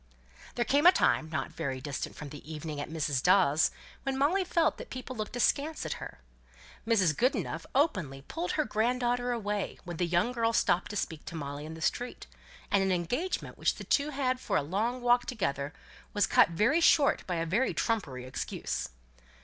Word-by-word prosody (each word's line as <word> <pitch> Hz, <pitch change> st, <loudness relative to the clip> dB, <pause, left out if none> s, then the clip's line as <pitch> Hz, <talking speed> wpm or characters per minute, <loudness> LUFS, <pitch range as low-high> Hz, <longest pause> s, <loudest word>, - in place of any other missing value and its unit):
There 240 Hz, -, 0 dB
came 290 Hz, +7 st, +4 dB
a -, -, +11 dB
time 160 Hz, -, +2 dB
not 155 Hz, -, -3 dB
very 130 Hz, -1 st, -3 dB
distant 140 Hz, +1 st, -5 dB
from 150 Hz, -, -8 dB
the 145 Hz, +2 st, -10 dB
evening 150 Hz, -1 st, -5 dB
at -, -, -6 dB
Mrs. 150 Hz, -4 st, -1 dB
Dawes' 170 Hz, -4 st, +4 dB, 0.3 s
when 270 Hz, -1 st, -2 dB
Molly 325 Hz, +8 st, +3 dB
felt 335 Hz, -3 st, +1 dB
that -, -, -9 dB
people 255 Hz, 0 st, -6 dB
looked 215 Hz, +1 st, -4 dB
askance 285 Hz, +6 st, +1 dB
at -, -, -1 dB
her. 65 Hz, -, -8 dB, 0.7 s
Mrs. 190 Hz, -9 st, +3 dB
Goodenough 230 Hz, -, 0 dB
openly 185 Hz, -, +1 dB
pulled 335 Hz, -, -3 dB
her 305 Hz, -, +1 dB
grand 240 Hz, +3 st, 0 dB
daughter 245 Hz, 0 st, +1 dB
away, 210 Hz, -4 st, -2 dB
when 175 Hz, -2 st, -6 dB
the 175 Hz, -, 0 dB
young 175 Hz, +7 st, +2 dB
girl 230 Hz, -2 st, +1 dB
stopped 180 Hz, -4 st, +2 dB
to 205 Hz, -, -6 dB
speak 160 Hz, -6 st, -3 dB
to -, -, -7 dB
Molly 145 Hz, -1 st, -5 dB
in 160 Hz, -, -7 dB
the 160 Hz, -, -10 dB
street, 245 Hz, +9 st, -2 dB, 0.5 s
and 200 Hz, -, +4 dB
an 190 Hz, 0 st, +1 dB
engagement 245 Hz, -, -2 dB
which -, -, +2 dB
the -, -, -8 dB
two 285 Hz, +1 st, +1 dB
had 265 Hz, -3 st, 0 dB
made -, -, -18 dB
for 195 Hz, -, 0 dB
a -, -, +1 dB
long 220 Hz, -, -1 dB
walk 245 Hz, 0 st, +3 dB
together 140 Hz, -, -2 dB, 0.4 s
was 205 Hz, -, +3 dB
cut -, -, +5 dB
very 210 Hz, -, +2 dB
short 300 Hz, -3 st, +5 dB
by 180 Hz, -, -1 dB
a 165 Hz, 0 st, -1 dB
very 205 Hz, +11 st, +1 dB
trumpery 140 Hz, -, -1 dB
excuse. 130 Hz, -, -4 dB
205 Hz, 200 wpm, -30 LUFS, 160-255 Hz, 0.7 s, a